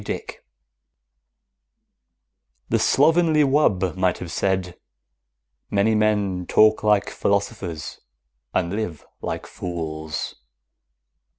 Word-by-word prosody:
DICK - - -6 2.3
_The - - +3
slovenly 160 +1 +4
wub 105 - +2
might 95 -1 +1
well - - -12
have 85 -2 -6
said: 95 -1 -1 0.9
Many 105 +2 +2
men 105 -4 +1
talk 110 0 +5
like 105 -2 +2
philosophers 100 -5 -2 0.5
and 85 - -1
live 105 -7 -4 0.2
like - - -4
fools. 80 -3 -5
100 Hz, 90 wpm, -23 LUFS, 90-110 Hz, 2.3 s, talk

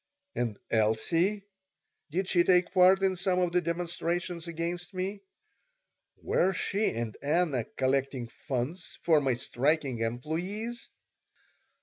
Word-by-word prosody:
And 115 -4 -2
Elsie? 165 - +2 0.7
Did 180 +5 -1
she 175 -2 +4
take 180 -1 +3
part 190 +1 +6
in 190 -1 +3
some 180 0 +1
of 180 -1 +2
the 180 +1 +2
demonstrations 170 0 -2
against 170 +2 -4
me? 195 +2 -3 1.0
Were 190 +2 +2
she 205 +3 0
and 115 -1 -4
Anna 145 -5 +1
collecting 130 -2 0
funds 135 +8 -5
for 160 -3 +4
my 135 -3 +1
striking 135 +1 0
employees? 175 - -3
170 Hz, 115 wpm, -29 LUFS, 135-185 Hz, 1.0 s, part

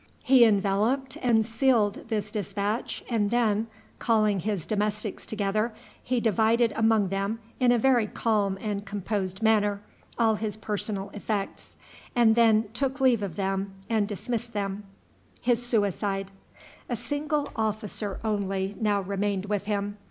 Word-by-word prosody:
He 255 -2 +7
enveloped 215 +6 +1
and 225 -3 +3
sealed 230 -3 +2
this 210 -2 -2
dispatch, 205 +1 -2
and 215 -4 +1
then, 225 -2 +1 0.3
calling 215 -4 +2
his 200 -2 -2
domestics 210 0 -2
together, 215 +2 -1 0.3
he 250 0 0
divided 225 +1 +2
among 220 -3 +3
them, 195 +3 -1 0.2
in 250 -2 +4
a 245 - +4
very 240 -2 +3
calm 205 -3 0
and 205 -2 -3
composed 200 -1 -3
manner, 210 -2 +3 0.4
all 225 -2 +4
his 215 -1 -3
personal 205 -2 -3
effects, 205 -1 -4 0.4
and 235 -2 +5
then 220 -2 +4
took 270 +2 -1
leave 255 -5 +4
of 195 -5 -4
them 195 0 -2 0.2
and 215 -2 +2
dismissed 235 +3 -4
them. 200 0 -3 0.6
A 205 -3 -2 0.2
single 300 0 -1
officer 215 -2 -2
only 195 -2 -1
now 205 -2 +2
remained 200 0 -1
with 205 -1 -2
him. 205 0 -2
210 Hz, 130 wpm, -27 LUFS, 200-230 Hz, 0.6 s, He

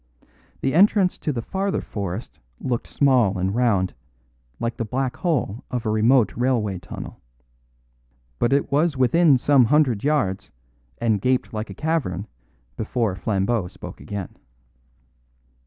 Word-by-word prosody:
The 135 - 0
entrance 190 +1 +4
to 150 - -1
the 120 -4 -4
farther 195 - -1
forest 100 +1 -5 0.2
looked 120 -2 -2
small 125 -9 +3
and 95 +1 -1
round, 105 -6 +1 0.7
like 115 0 -2
the - - -1
black 125 +3 -2
hole 130 - -1
of 125 -2 -3
a 110 - +1
remote 110 0 +3
railway 115 -6 0
tunnel. 85 - -9 1.2
But 120 - +2
it 140 0 +1
was 150 +1 +2
within 140 +3 +4
some 135 0 +4
hundred 130 -5 +2
yards, 135 -11 0 0.5
and 110 -4 +1
gaped 130 0 0
like 110 0 -4
a 95 - -8
cavern 130 - -1 0.5
before 110 -3 -1
Flambeau 100 +1 0
spoke - - -10
again. 100 -3 -6
120 Hz, 135 wpm, -23 LUFS, 100-140 Hz, 1.2 s, entrance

